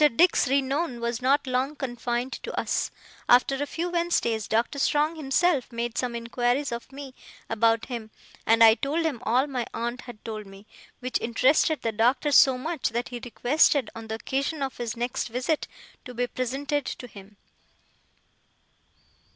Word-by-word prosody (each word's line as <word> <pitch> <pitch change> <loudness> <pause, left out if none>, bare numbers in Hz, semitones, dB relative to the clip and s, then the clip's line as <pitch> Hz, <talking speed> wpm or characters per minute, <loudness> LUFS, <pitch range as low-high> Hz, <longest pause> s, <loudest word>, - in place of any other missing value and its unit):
Mr. 295 -6 +4
Dick's 350 -4 +4
renown 275 0 0
was 235 0 -2
not 275 +3 +2
long 260 +3 -1
confined 245 -1 -3
to - - -5
us. - - -1 0.4
After 265 +3 +4
a 290 - -1
few 335 +4 -3
Wednesdays, 335 -11 0
Doctor 235 +5 0
Strong 300 +4 +2
himself 295 -1 +1
made 235 -1 -3
some 245 -2 -2
inquiries 245 +4 -1
of 235 +2 -6
me 275 -1 -9 0.4
about 225 0 +2
him, 235 -4 -6 0.3
and 230 +1 +5
I 220 -1 +9
told 295 +7 -1
him 290 -7 -1
all 250 +3 +2
my 255 -5 -3
aunt 240 +2 -3
had 240 -4 -12
told 215 -2 -6
me; 195 +1 -14 0.4
which 255 -1 -2
interested 260 +6 +2
the 225 - 0
Doctor 245 +7 +2
so 265 -1 +6
much 315 +3 -2
that 235 +2 -3
he 245 -1 -6
requested, 265 +1 +2
on 225 0 -9
the 220 - -3
occasion 275 +5 -2
of 270 - -4
his 235 -1 -4
next 240 +1 -2
visit, 255 +6 -1 0.4
to 250 - -9
be 245 +1 0
presented 275 +4 -2
to - - -6
him. 200 -2 -14
250 Hz, 165 wpm, -26 LUFS, 235-280 Hz, 0.4 s, I